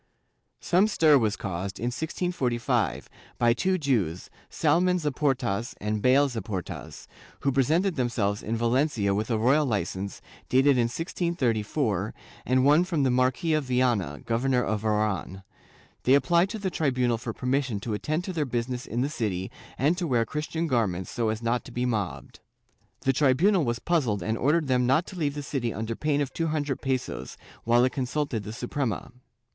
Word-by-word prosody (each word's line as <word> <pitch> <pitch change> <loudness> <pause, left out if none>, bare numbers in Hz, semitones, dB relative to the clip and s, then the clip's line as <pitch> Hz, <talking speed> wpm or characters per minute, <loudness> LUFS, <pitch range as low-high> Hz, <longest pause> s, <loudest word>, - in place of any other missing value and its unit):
Some 185 +4 +3
stir 155 -8 +5
was 110 -3 +1
caused, 95 +1 -4
in 120 +2 -2
1645, 125 - -1 0.3
by 120 -1 +4
two 185 +10 +1
Jews, 110 - -1 0.2
Salamon 175 +4 +2
Zaportas 130 - -1
and 105 0 -2
Bale 135 +4 +5
Zaportas, 110 -7 -6 0.4
who 140 - +1
presented 160 +8 +2
themselves 110 -5 0
in 115 +1 -2
Valencia 120 -3 +1
with 105 +3 -1
a 115 - +1
royal 130 +7 +3
licence, 100 -5 -2 0.3
dated 135 +3 +5
in 120 -2 +3
1634, 120 - -1 0.3
and 130 +1 +3
one 150 +4 +6
from 170 -6 0
the 130 - +2
Marquis 130 +6 +1
of 155 -2 +1
Viana, 120 - 0
Governor 125 +2 +1
of 105 0 -2
Oran. 105 -3 -1 0.6
They 130 - +5
applied 170 +5 +3
to 220 - -4
the 195 -3 -3
tribunal 125 -7 +1
for 120 0 -4
permission 125 -2 -1
to 110 +1 -3
attend 155 +10 -2
to 185 - -5
their 160 -3 0
business 125 +1 -3
in 120 - -2
the 135 - +1
city 100 -9 -3 0.3
and 145 +7 +2
to 175 - -1
wear 120 -5 +2
Christian 155 +4 -3
gar 120 -8 +2
ments, 90 0 -5
so 115 -2 0
as 110 +1 -3
not 115 +1 0
to - - -10
be 125 +1 -1
mobbed. 105 -7 -3 0.6
The 135 - +2
tribunal 155 +7 +3
was 120 0 0
puzzled 120 - 0
and 110 +5 -1
ordered 150 +6 +1
them 125 -1 +2
not 135 +7 +3
to - - -10
leave 150 -5 -1
the 145 - -4
city 130 -5 -2
under 110 +1 -4
pain 145 +1 0
of 140 - -3
two 165 - -1
hundred 145 -4 -2
pesos, 130 -2 -3 0.3
while 120 +1 +4
it 130 - 0
consulted 135 -3 -2
the 105 +1 -7
Suprema. 120 -3 -3
125 Hz, 175 wpm, -27 LUFS, 115-150 Hz, 0.6 s, one